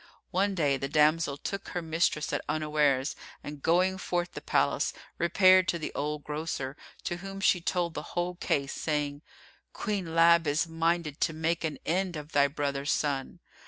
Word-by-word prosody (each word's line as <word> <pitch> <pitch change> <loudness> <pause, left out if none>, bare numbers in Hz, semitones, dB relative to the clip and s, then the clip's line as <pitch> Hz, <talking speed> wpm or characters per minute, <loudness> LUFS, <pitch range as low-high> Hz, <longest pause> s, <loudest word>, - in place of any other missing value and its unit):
One 195 +2 +1
day, 145 -5 +2
the 135 - -3
damsel 150 -1 +3
took 195 +6 -5
her 175 - -3
mistress 160 -1 0
at - - 0
unawares 150 -3 +1 0.3
and 145 -1 -8
going 185 +4 +2
forth 175 -1 -2
the - - -7
palace, 70 - +1 0.3
repaired 185 +2 +5
to 170 - +1
the 155 - -5
old 150 0 -3
grocer, 150 -3 -4 0.3
to 175 - -2
whom 195 +2 -7
she 190 -2 +3
told 170 -1 -1
the - - -4 0.2
whole 175 +1 0
case, 140 -5 -1
saying, 145 -2 -2 0.5
"Queen 190 -6 -3
Lab 170 0 +6
is 145 +4 +2
minded 165 -2 -1
to 165 - +2
make 160 +2 -1
an 155 -2 -2
end 180 +1 0
of 150 0 -7
thy 140 0 +4
brother's 140 0 -2
son." 145 +3 -1
160 Hz, 170 wpm, -29 LUFS, 145-175 Hz, 0.5 s, Lab